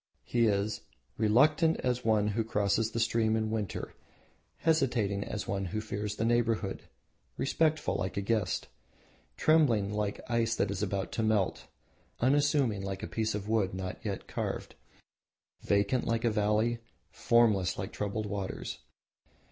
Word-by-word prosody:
He 120 -1 +2
is 100 0 0 0.3
"reluctant, 150 +9 +3
as 125 -1 -1
one 105 -2 +2
who 110 +2 0
crosses 110 0 +1
a - - +1
stream 115 -1 +2
in 110 -1 -1
winter; 105 -4 -3 0.6
hesitating 120 -11 +1
as 105 0 -5
one 95 0 -1
who 105 +4 -3
fears 105 -1 -4
the 110 - -1
neighbourhood; 115 -4 0 0.5
respectful, 155 +2 +1
like 95 +1 -3
a - - +1
guest; 105 -2 0 0.7
trembling, 120 -11 +3
like 105 -1 -2
ice 115 -1 +1
that - - 0
is 100 -1 -3
about 100 -1 -2
to - - -2
melt; 110 -3 0 0.5
unassuming, 135 -5 +2
like 95 -1 -5
a - - -3
piece 110 -1 -1
of 105 0 -4
wood 105 -4 +1
not 95 -1 -5
yet - - -4
carved; - - -4 0.9
vacant, 100 +5 +1
like 115 +1 0
a 115 - +3
valley; 105 +2 +1 0.3
formless, 110 -6 +3
like 95 +1 -5
troubled 105 +1 -2
waters." 100 -2 -4
110 Hz, 145 wpm, -30 LUFS, 100-115 Hz, 0.9 s, reluctant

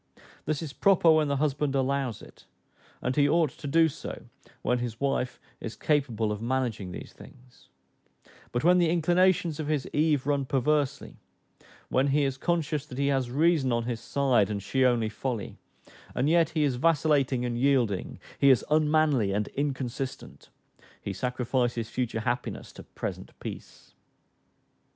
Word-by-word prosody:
This 155 +1 -1
is 150 -3 -6
proper, 180 -3 +4
when 155 -1 +3
the 140 - 0
husband 145 0 0
allows 135 -3 -1
it; - - -16 0.6
and 125 +1 -1
he 145 -1 +4
ought 160 -2 +2
to - - -9
do 165 +3 +4
so, 150 - -7 0.4
when 125 0 +1
his 120 -2 -4
wife 135 -2 -1 0.2
is 115 - -6
capable 120 -8 0
of 105 0 -4
managing 115 -6 -2
these - - -9
things; 125 - -17 0.8
but 120 +1 -1
when 180 +2 +5
the 170 -2 +3
inclinations 175 -1 +2
of 155 - -3
his 150 -3 -1
Eve 150 -3 +2
run 140 -1 0
perversely, 140 +2 0 0.7
when 130 +2 +2
he 145 +1 +2
is 135 -1 -2
conscious 155 -4 -1
that 125 - -9
he 140 0 +1
has 135 -3 0
reason 150 0 +2
on 115 0 0
his 120 -1 -3
side, 125 -4 +1
and 100 -2 -3
she 130 +6 +1
only 120 -3 +3
folly, 115 0 -4 0.6
and 130 - +1
yet 165 0 +4
he 155 - +3
is 135 -4 +1
vacillating 140 -4 +2
and 120 -1 -2
yielding, 125 -8 +1 0.2
he 140 - +5
is 130 -5 +4
unmanly 150 -8 +3
and 105 +1 -1
inconsistent; 135 -2 -4 0.5
he 100 - -5
sacrifices 120 0 -1
future 115 -2 -2
happiness 120 +2 -3
to - - -10
present - - -7
peace. - - -9
135 Hz, 160 wpm, -27 LUFS, 120-150 Hz, 0.8 s, when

